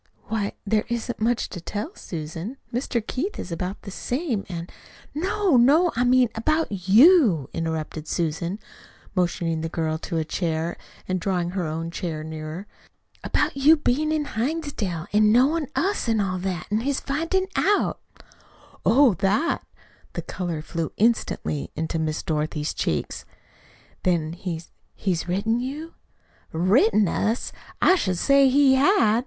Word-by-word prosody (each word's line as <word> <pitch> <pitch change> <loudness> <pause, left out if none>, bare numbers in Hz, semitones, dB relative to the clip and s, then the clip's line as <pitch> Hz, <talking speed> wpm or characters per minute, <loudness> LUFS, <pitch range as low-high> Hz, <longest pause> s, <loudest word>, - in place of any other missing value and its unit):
"Why, 210 -2 -1
there 215 +1 +2
isn't 235 0 -3
much 235 +1 +1
to 175 - -7
tell, 210 - -4
Susan. 165 - -6 0.2
Mr. 240 -2 -1
Keith 360 - -3
is 175 - -6
about 180 +4 -4
the 200 - -7
same, 245 - -2
and 170 -1 -6 0.2
" - - -23
"No, 375 0 +2
no, 305 +9 +5
I 245 - +2
mean 250 -1 +4
about 225 - -1
YOU" 225 - +6
interrupted 160 -1 -3
Susan, 170 +3 -2 0.6
motioning 170 -3 0
the 165 - -3
girl 160 -1 -2
to 165 0 -4
a 160 - 0
chair, 165 0 -2 0.3
and 185 0 0
drawing 175 -1 -1
her 180 -3 -2
own 165 +2 -4
chair 165 -3 -4
nearer. 155 +4 -6 0.6
"About - - 0
your 290 +4 +6
bein' 300 +2 +1
in 310 -1 0
Hinsdale 235 - -2
an' 210 0 +5
knowin' 280 +6 +3
us, 385 - 0
an' 225 -1 +2
all 185 -2 -1
that, 180 -1 -3
an' 210 - +2
his 275 +3 -1
finding 330 +7 0
it 380 - -9
out." 410 +1 +2 0.8
"Oh, 260 -1 +5
THAT!" 200 - +1 0.5
The - - -4
color 170 -4 -4
flew 165 0 -3
instantly 220 -9 0
into 160 +1 -2
Miss 155 -1 -2
Dorothy's 150 -1 -2
cheeks. 75 - -2 0.8
"Then 165 -3 0
he's 170 -2 -6 0.2
he's 180 -3 -1
written 205 +6 0
you?" 290 +6 -5 0.6
"Written 205 +4 +3
us! 220 +7 -1 0.3
I - - +7
should 185 - 0
say 275 +5 +5
he 275 0 +5
had! 265 - +4
205 Hz, 150 wpm, -24 LUFS, 170-270 Hz, 0.8 s, I